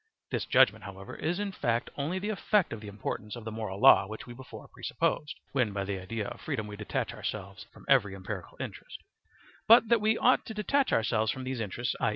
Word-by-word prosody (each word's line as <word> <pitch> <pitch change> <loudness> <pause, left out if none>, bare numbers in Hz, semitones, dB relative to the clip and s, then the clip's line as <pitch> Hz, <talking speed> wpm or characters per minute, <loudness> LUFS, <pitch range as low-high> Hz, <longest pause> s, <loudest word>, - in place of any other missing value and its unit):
This - - -1
judgement, - - +4
however, 95 -1 -8
is 170 +3 -1
in 205 -1 -2
fact 120 -9 -1
only 150 +6 -2
the 205 +3 -3
effect 210 - +1
of 110 - -7
the 105 - -9
importance 105 +1 -5
of 120 -2 -9
the 110 - -4
moral 105 -3 -5
law 100 - +7
which 110 +1 -7
we 120 - -9
before 130 +1 -11
presupposed 150 - -2
(when 125 -7 +1
by 100 -1 -1
the 95 -1 -3
idea 105 +3 -4
of - - -8
freedom 110 - -3
we 105 -1 -7
detach 105 0 -3
ourselves 100 +1 -6
from - - -16
every 105 -8 +4
empirical 95 -1 -7
interest); - - -7 0.7
but 230 0 +8
that 235 -2 +4
we 220 +1 +3
ought 255 - +4
to 220 - -6
detach 260 +6 +1
ourselves 110 -1 +2
from 130 - -6
these 130 -1 -3
interests, 115 +3 -2
i. - - +2
115 Hz, 215 wpm, -30 LUFS, 105-165 Hz, 0.7 s, but